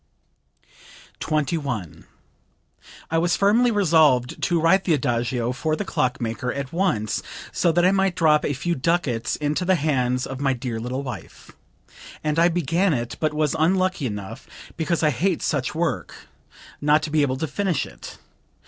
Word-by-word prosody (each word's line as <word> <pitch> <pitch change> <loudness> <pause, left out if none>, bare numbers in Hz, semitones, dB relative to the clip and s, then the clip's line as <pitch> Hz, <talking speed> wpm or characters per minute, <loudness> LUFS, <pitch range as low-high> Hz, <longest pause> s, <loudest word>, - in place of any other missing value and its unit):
21. 145 - -2 1.1
"I 165 - +2
was 175 +1 +1
firmly 225 +5 +4
resolved 160 - +3
to 170 -1 +1
write 190 +4 +4
the 165 - +2
Adagio 120 -2 -1
for 155 +4 -1
the 205 - -4
clock 125 -8 -1
maker 120 +2 -3
at 140 +1 -5
once 165 - 0 0.3
so 170 - +2
that 175 +2 +2
I 185 - +5
might 195 -2 +1
drop 155 -4 +3
a 145 - 0
few 170 +6 -1
ducats 135 -6 0
into 150 +4 -1
the 185 +1 +3
hands 130 -5 0
of 130 -1 -6
my 135 -1 +1
dear 120 -2 -4
little 125 +4 -4
wife; 125 -7 -9 0.7
and 150 +1 0
I 170 - +6
began 170 +1 +1
it, 120 -1 -4
but 155 -1 0
was 150 -1 +1
unlucky 185 -2 +1
enough 105 -3 -7 0.3
because 170 0 -1
I 150 - +4
hate 175 +5 0
such 140 -1 -1
work 150 - -2 0.7
not 150 +1 +3
to 155 - -4
be 155 0 +3
able 130 -2 0
to 160 - -2
finish 190 +1 -1
it. - - -11
150 Hz, 165 wpm, -23 LUFS, 125-175 Hz, 1.1 s, I